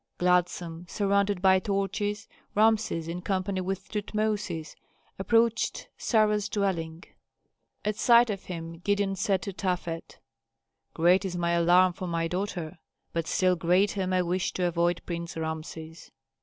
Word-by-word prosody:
Gladsome, 175 -1 0
surrounded 200 -1 +1
by 190 0 +6
torches, 200 +1 -2 0.3
Rameses, 215 -6 +2
in 175 +2 -4
company 190 0 -1
with 190 +1 -4
Tutmosis, 210 -6 -2 0.4
approached 230 +3 +1
Sarah's 210 -2 +2
dwelling. 170 -4 -2 0.8
At 210 0 -1
sight 235 0 +5
of 195 -2 -6
him 165 -2 -7
Gideon 200 +1 0
said 190 -2 0
to 200 - -5
Tafet, 175 -3 -3 0.8
"Great 175 +4 +4
is 180 -2 -3
my 170 0 0
alarm 175 +2 +4
for 185 - -6
my 165 -1 -1
daughter, 180 -2 -4 0.3
but 165 -1 -2
still 185 -1 +2
greater 185 +3 +2
my 185 0 +2
wish 180 +1 -1
to 180 - -1
avoid 175 0 +1
Prince 170 -1 -5
Rameses." 160 0 -6
185 Hz, 130 wpm, -28 LUFS, 170-200 Hz, 0.8 s, by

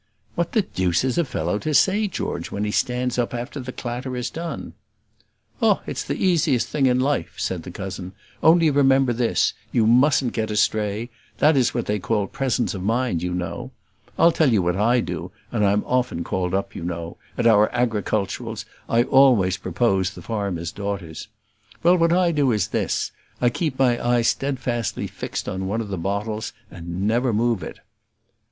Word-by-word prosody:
"What 170 0 -2
the 215 - +3
deuce 90 - 0
is 130 +4 0
a - - +4
fellow 90 - -2
to 155 +3 -1
say, 205 +6 +4
George, 85 - -4
when 100 - -3
he 105 - -1
stands 125 +2 0
up 120 0 -1
after 120 +4 -5
the 130 0 -6
clatter 125 +1 -5
is 125 0 -3
done?" 165 -2 -6 0.9
"Oh, - - +3
it's - - -4
the - - -3
easiest 160 -9 +2
thing 140 -3 +2
in 125 0 +3
life," 140 +3 0
said 95 -3 -2
the 85 - -9
cousin. 95 0 -6 0.3
"Only 165 -1 +5
remember 135 -2 +4
this: 120 0 +1 0.2
you 115 - +3
mustn't 125 +2 +4
get 110 -1 -1
astray; 105 +2 0 0.3
that 155 +1 +4
is 125 -3 +2
what 120 - -1
they 105 0 -1
call 105 +2 0
presence 120 -3 -1
of 95 - -5
mind, 115 -3 0
you 90 0 -2
know. 90 0 -4 0.5
I'll 170 - +6
tell 155 -5 +3
you 105 -5 +3
what 90 0 +1
I 120 +5 +3
do, - - -5 0.2
and 110 -3 0
I'm 100 +1 +3
often 125 -9 0
called 90 +1 -1
up, 100 - -2
you - - -6
know; 85 -1 -5 0.2
at - - 0
our 105 -2 +5
agriculturals 110 -2 -2 0.2
I 115 +1 +4
always 120 -9 +4
propose 95 0 +1
the 100 - -12
farmers' 100 -7 -3
daughters: 100 -6 -5 0.6
well, 175 +2 +6
what 165 -1 +3
I 175 0 +3
do 145 -5 +2
is 105 -4 0
this - - -1 0.3
I 120 -1 +3
keep 150 -1 -2
my 125 -3 +2
eye 120 0 +2
steadfastly 120 -2 -1
fixed - - -5
on 95 0 -3
one 105 +4 -1
of 110 -3 -4
the 95 - -3
bottles, 105 +4 -3 0.2
and 85 +2 -5
never 120 +4 +2
move 115 -1 +1
it." - - -7
115 Hz, 185 wpm, -23 LUFS, 100-130 Hz, 0.9 s, I'll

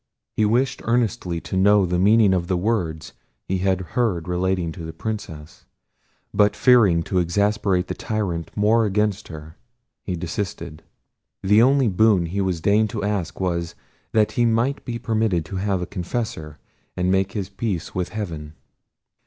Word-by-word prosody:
He 110 - +2
wished 125 +5 +1
earnestly 110 -7 0
to - - -5
know 100 +1 +4
the 90 0 -1
meaning 105 +1 +5
of 90 -2 -1
the 90 - 0
words 90 -6 -2 0.3
he 95 0 -1
had 95 0 +1
heard 100 -10 0
relating 90 -1 -1
to 85 +1 -9
the 80 0 -6
Princess; 80 -9 -7 0.7
but 105 0 +3
fearing 105 -10 +4
to 90 +2 0
exasperate 100 +1 +1
the - - -4
tyrant 100 -7 -3
more 110 +3 +3
against 105 0 0
her, 80 0 -10 0.5
he 90 - -3
desisted. 85 -2 -5 0.6
The 105 +3 +5
only 135 +1 +4
boon 100 -2 +3
he 90 +4 -3
deigned 105 +6 +2
to 110 -4 -4
ask 100 -5 -2
was, 85 -3 -2 0.4
that 110 -1 +2
he 120 - +1
might 120 +4 +1
be 120 -1 -3
permitted 110 -8 0
to 95 +4 -6
have 95 -1 -1
a 90 - -9
confessor, 85 -5 -4 0.4
and 90 +1 +1
make 95 0 +1
his 100 -3 -3
peace 100 -4 -4
with 90 -1 -2
heaven. 80 -8 -6
95 Hz, 160 wpm, -22 LUFS, 85-110 Hz, 0.7 s, meaning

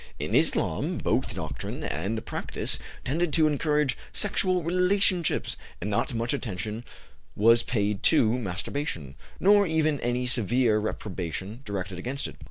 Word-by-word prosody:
In - - -3
Islam - - +2
both - - 0
doctrine - - -5
and 105 +7 -2
practice - - -2 0.2
tended 160 +5 0
to 160 -2 +5
encourage 150 -1 +2 0.2
sexual 185 -3 +1
relationships, 180 0 +2 0.2
and 105 +4 -3
not 120 +3 0
much 115 +2 0
attention 110 -3 -4 0.5
was 115 +3 +5
paid 105 -4 -1
to 120 -8 +4
masturbation, 95 - -4 0.3
nor 200 +1 +5
even 155 -2 +1
any 120 +1 -1
severe 120 -2 +2
reprobation 100 - -4
directed 95 -2 -4
against 130 +8 -2
it. - - -11
120 Hz, 130 wpm, -27 LUFS, 105-155 Hz, 0.5 s, to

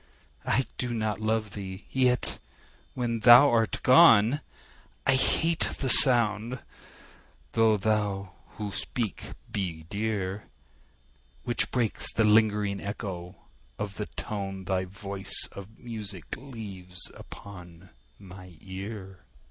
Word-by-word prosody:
I 130 - +2
do 120 -1 -2
not 110 -2 -2
love 110 -1 -1
thee!—yet, 105 +6 -1 0.6
when 120 -2 -2
thou 120 +5 +8
art 115 -1 0
gone, 130 -2 +6 0.6
I 135 - +4
hate 160 +5 +2
the 135 - -1
sound 120 -2 +5 0.9
(though 110 -1 +3
those 100 -2 -1 0.3
who 105 -2 -4
speak 115 +1 -3 0.2
be 85 -5 -4
dear) 100 -2 -2
10 - - -24 1.0
Which 120 - +1
breaks 120 -4 +1
the 110 - +2
lingering 105 -2 +2
echo 95 -3 -6 0.4
of 100 -3 -5
the - - -4
tone 95 -2 -5
Thy 95 0 -1
voice 95 +1 -1
of 100 +3 -11
music 105 -7 -7
leaves 100 -9 -6
upon 90 -3 -12 0.3
my 90 -3 -13
ear. 95 0 -8
105 Hz, 110 wpm, -27 LUFS, 95-115 Hz, 1.0 s, thou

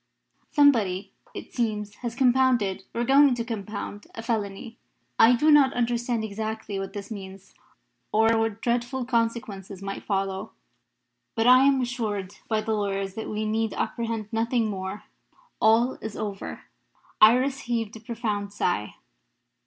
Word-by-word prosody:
Somebody, 225 -11 +3 0.2
it - - -8
seems, 210 -4 -2
has 235 -2 -5
compounded 245 -7 +2
or 235 - -2
is 240 - -1
going 275 -1 +6
to 235 - -2
compound 210 -2 -6
a 225 - -6
felony. 225 0 -3 0.4
I 235 +2 +7
do 300 +6 +4
not 280 -3 +6
understand 240 -1 0
exactly 220 -1 -4
what 195 0 -5
this 205 +1 -7
means, 195 -2 -9 0.6
or 225 +1 +4
what 225 -1 -1
dreadful 245 +2 -1
consequences 230 -5 -2
might 195 0 -5
follow; 195 +1 -2 0.8
but 225 - +1
I 255 +2 +7
am 275 -1 +4
assured 210 -6 -3
by 220 -1 +1
the 220 - -2
lawyers 195 -2 -2
that 220 +1 -5
we 215 0 -2
need 220 +1 -1
apprehend 225 -3 -3
nothing 230 0 +1
more. 190 +1 -5 0.6
All 230 +4 +4
is 220 -2 -6
over." 200 -2 -5 0.6
Iris 255 +5 +5
heaved 230 -4 -3
a - - -8
profound 215 -3 -3
sigh. 175 - -1
225 Hz, 145 wpm, -26 LUFS, 205-240 Hz, 0.8 s, I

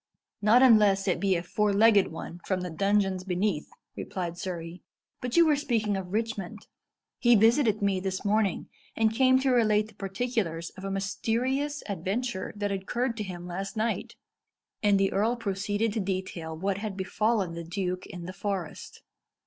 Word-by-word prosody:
"Not 225 +5 +6
unless 210 -5 +5
it 185 - +1
be 195 -2 +2
a 170 - -2
four 210 +3 0
legged 205 -1 +5
one 165 +1 -8
from 185 -2 -1
the 180 -1 -4
dungeons 195 +1 +1
beneath," 185 -3 -1 0.3
replied 175 -3 -4
Surrey. 170 -1 -6 0.4
"But 250 +2 -2
you 340 - +7
were 305 -2 +4
speaking 225 -8 0
of 185 -2 -5
Richmond. 215 -3 -3 0.5
He 240 -1 +5
visited 220 -1 +4
me 195 -2 +2
this 190 +1 -4
morning, 205 -2 +1 0.3
and 220 0 +2
came 260 +2 +5
to 265 -1 +2
relate 215 -3 +3
the - - -17
particulars 195 -4 -3
of 190 - -12
a 195 - -3
mysterious 245 +9 -1
adventure 200 +3 -3
that 205 -1 -2
occurred 230 +6 -2
to 215 - -2
him 175 -3 -7
last 190 +4 -5
night." 225 +1 -2 0.7
And 205 -2 +4
the 195 0 +2
earl 220 +5 +2
proceeded 205 0 -1
to 225 - -1
detail 185 -4 -4
what 195 +3 -1
had 205 -2 -5
befallen 200 -1 0
the 170 0 -6
duke 180 +2 -3
in 175 -1 -8
the 185 - -6
forest. 195 -4 -5
200 Hz, 170 wpm, -28 LUFS, 185-225 Hz, 0.7 s, you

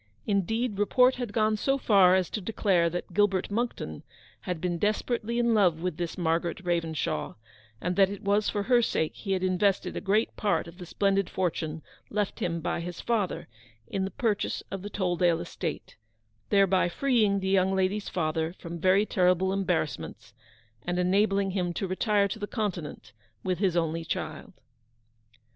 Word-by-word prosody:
Indeed, 210 +2 0
report 250 +5 +4
had 245 -4 -4
gone 215 0 +2
so 270 +5 +1
far 195 -7 +5
as 185 -3 0
to 215 - -3
declare 185 -4 +1
that 175 +1 -5
Gilbert 195 0 +2
Monckton 210 - -3 0.4
had 180 -3 -4
been 175 0 -2
desperately 225 +3 -1
in 235 -1 +3
love 180 -7 +3
with 175 -2 -3
this 175 -2 -4
Margaret 170 +1 -1
Ravenshaw, 165 - -1 0.4
and 180 +1 -2
that 195 -1 +5
it 200 - -7
was 205 +1 +2
for 205 -1 -1
her 245 +2 +4
sake 160 -8 0
he 195 -3 -3
had 185 -1 -1
invested 185 +1 +1
a - - -3
great 210 +3 +1
part 205 -4 0
of 170 +2 -13
the 180 - -8
splendid 195 0 +1
fortune 160 -3 -2 0.3
left 210 -1 -2
him 170 -1 -2
by - - -2
his 175 0 -6
father 220 -6 -1 0.4
in 190 - -2
the 190 - -2
purchase 225 -3 -1
of 195 - -4
the 205 - -6
Tolldale 175 -4 +1
estate: - - -5 0.5
thereby 195 -3 +3
freeing 215 -3 +2
the 190 0 -2
young 190 0 +3
lady's 190 +2 0
father 160 -1 -1
from 170 -2 -8
very 190 +4 +4
terrible 185 -1 +2
embarrassments, 190 - -2 0.5
and 175 0 -2
enabling 195 +2 +2
him 180 -2 -1
to 195 - -2
retire 200 +2 +1
to 215 +3 -6
the 205 - -4
Continent 175 - -4 0.3
with 185 -2 -1
his 185 -4 +1
only 165 0 0
child. 155 -2 -5
190 Hz, 170 wpm, -28 LUFS, 175-205 Hz, 0.5 s, far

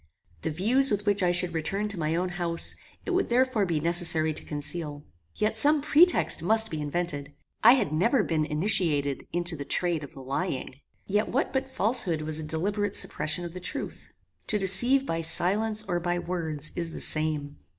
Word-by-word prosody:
The - - -3
views 230 - +4
with 205 -2 -1
which 205 -1 +2
I 180 -1 +2
should 175 -1 +2
return 195 +6 -2
to 200 -4 -2
my 155 0 -1
own 180 +2 -1
house, 175 -1 -1 0.3
it - - -3
would 370 +1 0
therefore 240 -4 +1
be 165 -3 -1
necessary 165 -1 +1
to - - -2
conceal. 150 0 -5 0.3
Yet 215 +1 -1
some 295 +7 +4
pretext 310 - +4
must 220 +5 +2
be 155 -1 -4
invented. 145 -2 -3 0.3
I - - +9
had 250 - 0
never 215 - +2
been 160 -4 -1
initiated 150 -3 -1
into 175 0 -1
the 145 - -6
trade 170 +1 0
of 145 - -11
lying. 135 0 -5 0.2
Yet 205 +2 -1
what 275 +5 -1
but 265 0 -2
falshood 205 -10 +2
was 155 0 -3
a - - -5
deliberate 200 +6 -2
suppression 155 +3 0
of 170 - -8
the 185 - -7
truth? 180 - -6 0.4
To 210 - +3
deceive 245 +8 +4
by 165 -6 -2
silence 210 +6 +2
or 175 -4 -2
by 175 0 -2
words 160 -4 -4
is 170 -2 -4
the - - -7
same. 155 -2 -1
175 Hz, 185 wpm, -26 LUFS, 155-210 Hz, 0.4 s, I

